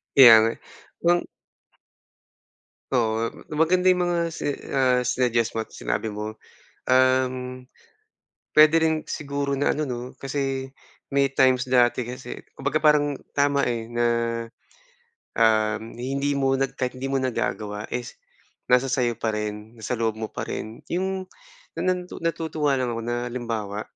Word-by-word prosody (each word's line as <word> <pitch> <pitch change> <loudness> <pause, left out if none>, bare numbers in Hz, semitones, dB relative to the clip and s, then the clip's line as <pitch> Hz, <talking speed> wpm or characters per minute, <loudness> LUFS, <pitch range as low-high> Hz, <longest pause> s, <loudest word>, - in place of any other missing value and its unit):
Kaya 125 -4 +11
nga, 115 - +2
eh. - - -20 0.5
Yung 175 +1 +3 1.7
Oo, 115 -2 +1
m - - -14 0.2
maganda 180 +4 +3
yung 180 -1 +4
mga 175 -1 0
si 165 - -7 0.2
ah, 130 -2 +3
sinuggest 120 -2 0
mo 110 - -1
at - - -25
sinabi 105 - -3
mo. 105 +1 -5 0.5
Um, 130 0 +2 0.9
puwede 155 +1 +7
rin 160 -1 0
siguro 140 -1 -2
na 140 - +2
ano 150 -1 -2
'no, 125 0 -5
kasi 135 -1 -2 0.4
may 140 -1 +1
times 130 -1 +3
dati 125 -1 +3
kasi 125 +1 -8
kumbaga 140 +3 -3
parang 150 -2 +3 0.2
tama, 140 0 +2
eh, 115 -2 -2
na, 120 0 -1 1.3
um, 110 -1 +3 0.2
hindi 140 +3 -1
mo 135 -1 +2
na 135 0 +1
kahit 130 -1 -3
hindi 130 +1 -5
mo 135 - +1
nagagawa 110 -5 -2
is 120 -1 -4 0.6
nasa 125 +1 +5
sa'yo 120 -3 +1
pa 110 -1 -1
rin, 105 +1 -4
nasa 115 +2 -3
loob 115 -1 0
mo 110 -1 -4
pa - - -5
rin. 110 +1 -6
Yung 190 +1 -1 0.5
na - - -5
nandu 180 0 -7
natutuwa 160 -4 0
lang 125 -2 -1
ako 115 - -4
na 120 +1 -2
halimbawa, 115 -4 -4
130 Hz, 150 wpm, -24 LUFS, 115-140 Hz, 1.7 s, Kaya